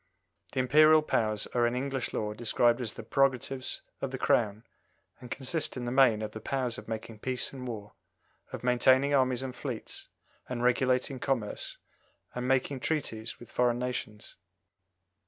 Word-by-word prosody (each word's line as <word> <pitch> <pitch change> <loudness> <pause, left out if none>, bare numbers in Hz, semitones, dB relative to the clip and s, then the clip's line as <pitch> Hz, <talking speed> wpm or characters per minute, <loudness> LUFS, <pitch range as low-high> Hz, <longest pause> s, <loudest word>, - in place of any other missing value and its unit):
The - - -1
Imperial 155 +4 +6
powers 110 -7 +1
are 120 -1 +3
in 120 - -1
English 135 0 -2
law 105 -1 -2
described 120 +2 +2
as 115 -3 -2
the - - -8
prerogatives 135 -1 0 0.2
of 135 - -1
the 130 - -4
Crown, 110 -4 +1 0.6
and 125 - -11
consist 140 +3 -1
in 125 - -4
the 120 - -2
main 125 -5 +4
of 105 - -4
the 110 - -8
powers 125 -1 -2
of - - -13
making 110 0 -6
peace 130 +3 -2
and 130 -2 -7
war, 105 -4 -6 0.6
of - - -6
maintaining 130 +3 +4
armies 130 -2 +2
and 130 -1 -5
fleets - - -6 0.4
and 120 -1 -3
regulating 130 +1 +2
commerce, 120 -7 -2 0.6
and 125 0 -3
making 130 +1 +1
treaties 125 -6 -2
with 120 - -13
foreign 120 -1 +2
nations. 120 -4 -5
125 Hz, 160 wpm, -30 LUFS, 115-130 Hz, 0.6 s, Imperial